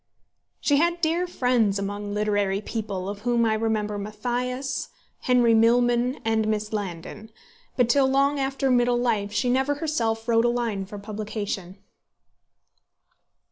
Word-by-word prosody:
She 285 Hz, -, +2 dB
had 340 Hz, +3 st, +2 dB
dear 340 Hz, +2 st, +1 dB
friends 245 Hz, -, +1 dB
among 205 Hz, +1 st, -4 dB
literary 205 Hz, -2 st, 0 dB
people, 205 Hz, -4 st, -4 dB
of 200 Hz, 0 st, -5 dB
whom 235 Hz, +1 st, +1 dB
I 220 Hz, -, +2 dB
remember 215 Hz, -2 st, -1 dB
Mathias, 250 Hz, +6 st, -3 dB, 0.3 s
Henry 245 Hz, -2 st, +3 dB
Milman, 240 Hz, +3 st, +3 dB
and 220 Hz, -1 st, +1 dB
Miss 215 Hz, 0 st, -2 dB
Landon; 205 Hz, +1 st, -5 dB, 0.5 s
but 245 Hz, -2 st, +4 dB
till 265 Hz, +3 st, +4 dB
long 275 Hz, +2 st, +2 dB
after 270 Hz, 0 st, 0 dB
middle 245 Hz, 0 st, +3 dB
life 220 Hz, -4 st, 0 dB
she 250 Hz, -, 0 dB
never 265 Hz, +3 st, +1 dB
herself 230 Hz, -8 st, -1 dB
wrote 230 Hz, 0 st, +3 dB
a -, -, +4 dB
line 230 Hz, -5 st, -2 dB
for 205 Hz, -, -8 dB
publication. 205 Hz, -3 st, -5 dB
225 Hz, 140 wpm, -25 LUFS, 210-250 Hz, 0.5 s, but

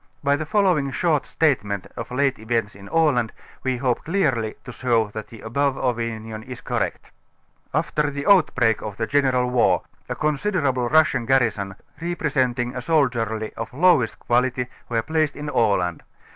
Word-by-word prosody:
By 140 Hz, 0 st, +3 dB
the 155 Hz, +1 st, -4 dB
following 180 Hz, -8 st, +2 dB
short 155 Hz, +1 st, 0 dB
statement 105 Hz, -, 0 dB
of -, -, -6 dB
late 135 Hz, 0 st, 0 dB
events 110 Hz, -1 st, -1 dB
in 100 Hz, 0 st, -12 dB
Aland 145 Hz, -9 st, +2 dB, 0.3 s
we 130 Hz, -1 st, -1 dB
hope 125 Hz, -1 st, 0 dB
clearly 135 Hz, -, 0 dB
to -, -, -8 dB
show 115 Hz, -3 st, +1 dB
that 110 Hz, 0 st, -7 dB
the 115 Hz, -, -12 dB
above 140 Hz, +4 st, 0 dB
opinion 115 Hz, -3 st, -3 dB
is 125 Hz, +2 st, -9 dB
correct. -, -, -3 dB, 0.6 s
x\fter 150 Hz, -1 st, 0 dB
the 140 Hz, 0 st, -5 dB
outbreak 150 Hz, -, +4 dB
of 105 Hz, -2 st, -6 dB
the 110 Hz, -, 0 dB
general 130 Hz, -2 st, +2 dB
war, 125 Hz, -2 st, +3 dB, 0.3 s
a -, -, -2 dB
considerable 145 Hz, -5 st, 0 dB
Russian 150 Hz, -6 st, +3 dB
garrison, 110 Hz, -7 st, +1 dB, 0.3 s
representing 130 Hz, -8 st, -1 dB
a 125 Hz, -, -3 dB
soldiery 115 Hz, -7 st, 0 dB
of 115 Hz, -, -6 dB
lowest 150 Hz, -7 st, +4 dB
quality, 125 Hz, +1 st, +1 dB, 0.2 s
were 115 Hz, -2 st, 0 dB
placed 155 Hz, 0 st, 0 dB
in 150 Hz, 0 st, -5 dB
Aland. 90 Hz, -, +1 dB
125 Hz, 155 wpm, -23 LUFS, 115-145 Hz, 0.6 s, outbreak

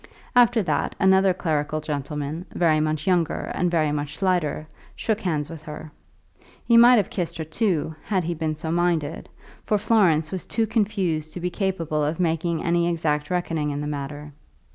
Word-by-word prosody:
After 240 Hz, -2 st, +5 dB
that, -, -, -1 dB
another 190 Hz, -1 st, +5 dB
clerical 155 Hz, -3 st, -1 dB
gentleman, 150 Hz, +2 st, -4 dB
very 160 Hz, -3 st, +3 dB
much 155 Hz, 0 st, -1 dB
younger 175 Hz, -4 st, 0 dB
and 180 Hz, -, 0 dB
very 155 Hz, -3 st, +1 dB
much 150 Hz, 0 st, -3 dB
slighter, 175 Hz, -6 st, 0 dB, 0.3 s
shook 220 Hz, -1 st, -1 dB
hands 155 Hz, -7 st, -1 dB
with 165 Hz, -2 st, -9 dB
her. 155 Hz, 0 st, -9 dB, 0.7 s
He 235 Hz, -, +4 dB
might 240 Hz, +2 st, +8 dB
have 210 Hz, -5 st, +1 dB
kissed 175 Hz, -4 st, -3 dB
her, 160 Hz, -, -3 dB
too, 160 Hz, -1 st, -1 dB
had 190 Hz, -4 st, 0 dB
he 170 Hz, +1 st, -2 dB
been 160 Hz, -1 st, -2 dB
so 160 Hz, +1 st, -4 dB
minded, 170 Hz, -3 st, 0 dB, 0.3 s
for 210 Hz, -, +1 dB
Florence 190 Hz, -8 st, +2 dB
was 190 Hz, -2 st, -5 dB
too 225 Hz, 0 st, 0 dB
confused 195 Hz, -8 st, -1 dB
to -, -, -5 dB
be 180 Hz, +1 st, -2 dB
capable 170 Hz, -6 st, -1 dB
of 155 Hz, +3 st, -1 dB
making 165 Hz, -1 st, 0 dB
any 170 Hz, 0 st, +2 dB
exact 150 Hz, -3 st, -1 dB
reckoning 165 Hz, -4 st, -1 dB
in 145 Hz, 0 st, -3 dB
the 150 Hz, -, -3 dB
matter. 145 Hz, 0 st, -5 dB
165 Hz, 175 wpm, -24 LUFS, 150-185 Hz, 0.7 s, might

